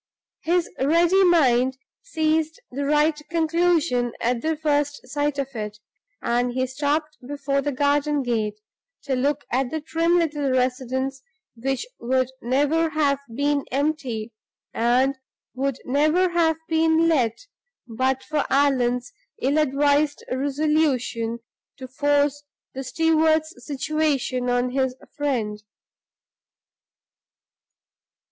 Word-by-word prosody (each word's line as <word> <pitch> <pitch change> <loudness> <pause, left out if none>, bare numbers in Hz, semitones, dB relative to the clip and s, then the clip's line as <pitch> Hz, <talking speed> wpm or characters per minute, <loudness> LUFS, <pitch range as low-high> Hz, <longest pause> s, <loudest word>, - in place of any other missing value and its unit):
His 345 +1 +1
ready 340 +7 +4
mind 260 -7 +3 0.2
seized 315 +1 0
the 280 +2 -3
right 300 +1 +2
conclusion 330 -7 +1
at 235 0 0
the 320 +2 -1
first 290 -2 -1
sight 290 +1 -1
of 275 -1 -2
it; 210 -2 -5 0.5
and 245 +1 0
he 260 +1 0
stopped 295 +4 -2
before 280 -1 -1
the 290 - -1
garden 285 +1 +1
gate, 215 -4 -1 0.4
to 275 -2 -1
look 285 +3 0
at 255 0 +1
the 315 - -3
trim 330 +3 +1
little 295 -4 0
residence 260 +1 -1 0.3
which 270 - -2
would 255 +1 0
never 290 +6 +1
have 290 -3 +1 0.2
been 285 +1 +1
empty, 260 -6 -2 0.4
and 255 +4 +2 0.3
would 270 0 -1
never 310 +7 +2
have 330 -2 +2
been 320 0 +3
let, 260 - +1 0.4
but 260 +3 -1
for 305 -2 -1
Allan's 250 -3 +1 0.3
ill 280 +4 +1
advised 290 +1 +2
resolution 265 -4 0 0.4
to 260 -2 -8
force 290 +2 +1 0.3
the 270 - -5
steward's 315 +2 +2
situation 280 -3 -1
on 245 0 +1
his 260 -1 0 0.2
friend. 235 -8 -2
285 Hz, 110 wpm, -23 LUFS, 255-310 Hz, 0.5 s, ready